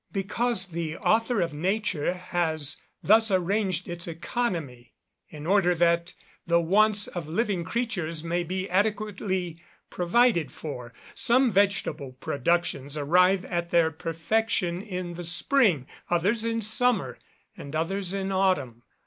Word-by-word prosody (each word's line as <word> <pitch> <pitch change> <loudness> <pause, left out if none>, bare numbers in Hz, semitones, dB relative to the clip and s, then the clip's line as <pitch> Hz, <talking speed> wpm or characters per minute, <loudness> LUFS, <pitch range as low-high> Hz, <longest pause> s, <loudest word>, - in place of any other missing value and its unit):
_ - - -57
Because 195 0 0
the 165 -2 -4
Author 225 -1 +2
of 170 -3 -1
Nature 180 0 -1
has 165 -5 -1 0.2
thus 220 +2 +5
arranged 185 -1 0
its 175 0 -5
economy, 165 - -4 0.4
in 150 -1 -9
order 180 -1 +3
that 170 +1 +1 0.3
the 170 0 +4
wants 205 +4 +3
of 175 -4 -6
living 185 +1 -1
creatures 175 -8 -3
may 170 +1 -1
be 185 +2 -3
adequately 190 -3 -1 0.3
provided 180 - +2
for. 125 -6 -7 0.2
Some 250 +1 +3
vegetable 185 -9 0
productions 140 +1 -1
arrive 180 +6 +3
at 170 -1 -3
their 170 -2 +3
perfection 175 +3 -1
in 180 -4 -5
the 175 +1 -7
spring; 175 - +2 0.2
others 200 +6 +1
in 230 0 -1
summer; 215 - +1 0.4
and 140 +2 -8
others 185 +3 -1
in 195 0 -2
autumn. 185 -12 0
180 Hz, 130 wpm, -26 LUFS, 165-205 Hz, 0.4 s, thus